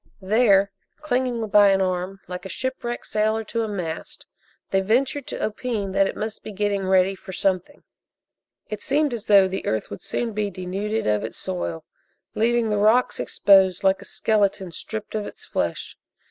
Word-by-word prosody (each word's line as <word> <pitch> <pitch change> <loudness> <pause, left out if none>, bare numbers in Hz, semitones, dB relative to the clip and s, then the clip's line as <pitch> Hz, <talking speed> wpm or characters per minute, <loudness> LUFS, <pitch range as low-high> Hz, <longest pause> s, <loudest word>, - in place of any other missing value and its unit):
There, 200 -1 +3 0.3
clinging 250 -5 -1
by 205 0 +6
an 195 0 +3
arm 185 +1 -2
like 180 0 -6
a 190 - -7
shipwrecked 240 +2 -3
sailor 220 +1 0
to 230 +2 -3
a 225 - -1
mast, 175 -6 -5 0.5
they 195 - +3
ventured 255 +7 0
to - - -2
opine 215 -2 -3
that 195 0 +3
it - - -4
must 215 0 -4
be - - -8
"getting 200 -1 -1
ready 190 0 +4
for 190 - -10
something." 190 +8 -1 0.8
It 215 -1 -6
seemed 290 -1 +1
as 225 -2 -5
though 200 -2 +7
the 190 +1 -4
earth 110 -1 -1
would 100 - -7
soon 235 -2 -3
be 210 0 -1
denuded 195 +4 -3
of 105 -1 +1
its 110 - -5
soil, 85 -2 -4 0.5
leaving 230 0 +1
the 210 - +1
rocks 220 +4 +3
exposed 190 -2 +4
like 190 0 +3
a - - -11
skeleton 200 -4 0
stripped 215 +5 -6
of 215 -1 -2
its - - -10
flesh. - - -3
205 Hz, 175 wpm, -23 LUFS, 190-225 Hz, 0.8 s, though